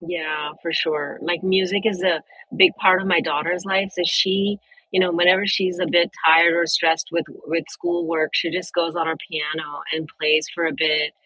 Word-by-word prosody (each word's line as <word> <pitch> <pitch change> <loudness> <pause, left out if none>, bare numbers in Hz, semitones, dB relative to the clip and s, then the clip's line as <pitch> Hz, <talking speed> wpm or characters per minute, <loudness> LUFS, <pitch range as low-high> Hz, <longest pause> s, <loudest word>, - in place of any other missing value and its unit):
Yeah, 155 -3 -4
for 170 - -4
sure. 150 -3 -2
Like, 170 +1 -2
music 190 +2 +1
is 195 -5 -1
a 175 -4 +1 0.4
big 365 -3 +7
part 185 -2 +5
of 195 - -5
my 175 -3 +3
daughter's 170 +5 -2
life, 195 0 0
so 180 - -3
she 195 +3 +1 0.3
you 185 - +1
know, 185 -1 +2
whenever 180 +3 +4
she's 185 -2 0
a 180 - -1
bit 170 0 +3 0.2
tired 165 +1 +6
or 170 0 +1
stressed 160 0 +2
with 170 -1 -2 0.2
with 165 0 -2
schoolwork, 165 -2 -2
she 170 - +1
just 180 -1 -4
goes 170 -1 -1
on 165 -1 -2
her 160 - -2
piano 155 -2 -5
and 160 -1 -4
plays 155 0 +3
for 170 -1 -1
a 160 - -2
bit. 150 -1 +1
170 Hz, 205 wpm, -21 LUFS, 160-185 Hz, 0.4 s, big